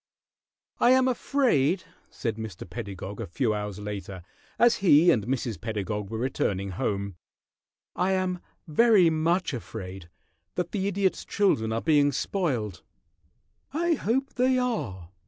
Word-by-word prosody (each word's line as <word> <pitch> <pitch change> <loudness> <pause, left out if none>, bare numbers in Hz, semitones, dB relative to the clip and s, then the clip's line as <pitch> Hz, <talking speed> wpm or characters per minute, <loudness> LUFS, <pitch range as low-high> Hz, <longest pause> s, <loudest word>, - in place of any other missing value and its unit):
"I - - +5
am 260 0 +4
afraid," 225 - +2 0.3
said 115 -2 -3
Mr. 110 -6 -7
Pedagog 95 +2 -6
a - - -4
few 110 +5 0
hours 105 -2 -4
later, 100 -3 -6 0.3
as 240 0 +5
he 170 -2 +6
and 110 -7 +1
Mrs. 120 -7 -2
Pedagog 105 -1 -3
were 110 - -4
returning 100 -6 -1
home, 100 0 -2 0.8
"I 185 +2 +1
am 185 -1 0 0.3
very 185 +1 +5
much 165 +2 +1
afraid 95 -7 -7 0.5
that 180 -1 -2
the 195 -2 -1
Idiot's 195 -1 0
children 115 - +1
are 115 +1 -1
being 145 -3 +4
spoiled." 125 - -2 0.9
"I 340 +3 +2
hope 265 -1 -1
they 255 +1 +2
are!" 110 - -2
135 Hz, 135 wpm, -27 LUFS, -, 0.9 s, he